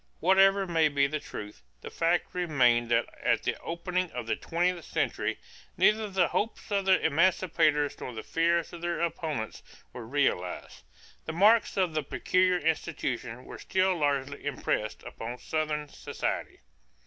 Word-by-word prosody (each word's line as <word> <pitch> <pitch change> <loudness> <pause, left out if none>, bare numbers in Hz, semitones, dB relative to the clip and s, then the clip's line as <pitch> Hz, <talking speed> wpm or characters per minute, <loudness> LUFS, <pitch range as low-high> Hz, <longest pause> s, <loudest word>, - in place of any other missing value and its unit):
Whatever 195 +2 +4
may 165 -3 +3
be 140 -1 +2
the 155 +2 -2
truth, 105 - -9 0.2
the - - -8
fact 170 +1 0
remained 125 -9 +2
that 120 0 +3 0.2
at - - +1
the - - 0
opening 180 +2 -2
of 120 -1 -4
the 115 - 0
twentieth 175 +1 -1
century - - -1 0.4
neither 215 0 +3
the 185 -3 +2
hopes 220 0 -3
of 200 -1 +1
the 190 0 +5
emancipators 160 -2 +2
nor - - -5
the 110 -2 -7
fears 170 +1 +1
of 170 - -8
their 175 0 -2
opponents 155 -9 -3 0.3
were 120 -3 -8
realized. 120 -10 -1 0.4
The 160 - -4
marks 210 +7 +4
of 185 -4 +1
the 155 - 0
"peculiar 185 +5 +1
institution" 140 -7 -2
were - - -9
still 185 0 +1
largely 140 -3 -1
impressed 130 -6 -2
upon 120 +2 -7
Southern 155 +1 -2
society. 140 - -4
160 Hz, 150 wpm, -29 LUFS, 140-180 Hz, 0.4 s, the